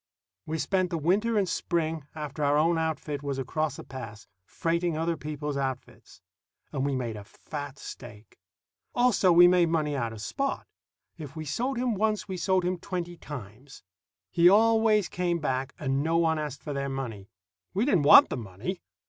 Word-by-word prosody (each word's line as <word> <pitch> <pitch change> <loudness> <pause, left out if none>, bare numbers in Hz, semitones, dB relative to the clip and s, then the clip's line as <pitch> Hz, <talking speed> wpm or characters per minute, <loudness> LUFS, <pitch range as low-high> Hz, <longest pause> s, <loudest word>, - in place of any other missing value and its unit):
We 160 +1 -2
spent 185 +3 0
the 170 - -2
winter 205 +9 +1
and 200 -2 +2
spring, 160 -4 -2
after 150 -1 -4
our 145 +1 +3
own 165 +2 +3
outfit 155 -3 -2
was 140 -2 -3
across 150 +3 -2
the - - -9
pass, 110 -6 -9 0.2
freighting 170 0 -1
other 165 +1 0
people's 150 -1 -4
outfits; 130 -8 -5 0.5
and 135 -3 -2
we 140 -1 0
made 120 -4 -3
a 105 - -8
fat 145 +6 -8
stake. 110 -9 -11 0.6
Also, 240 -7 +4
we 175 +1 +8
made 175 -2 +4
money 155 -3 0
out 115 -4 -2
of 110 - -9
Spot. 275 - -2 0.5
If 150 -1 -8
we 155 -1 -5
sold 245 - -2
him 245 -1 0
once, 215 +1 0
we 190 - -4
sold 185 0 +1
him 180 0 -1
twenty 175 -2 -4
times. 130 - -10 0.5
He 175 0 +6
always 220 0 +4
came 175 -1 -1
back, 135 -3 -2
and 135 -1 -1
no 165 +2 +1
one 160 -2 +2
asked 150 -3 -5
for 150 - -4
their 140 0 -2
money. 115 -7 -5 0.5
We 210 +5 +2
didn't 195 - +3
want 145 - +8
the - - -3
money. 115 - -6
155 Hz, 180 wpm, -28 LUFS, 135-180 Hz, 0.6 s, we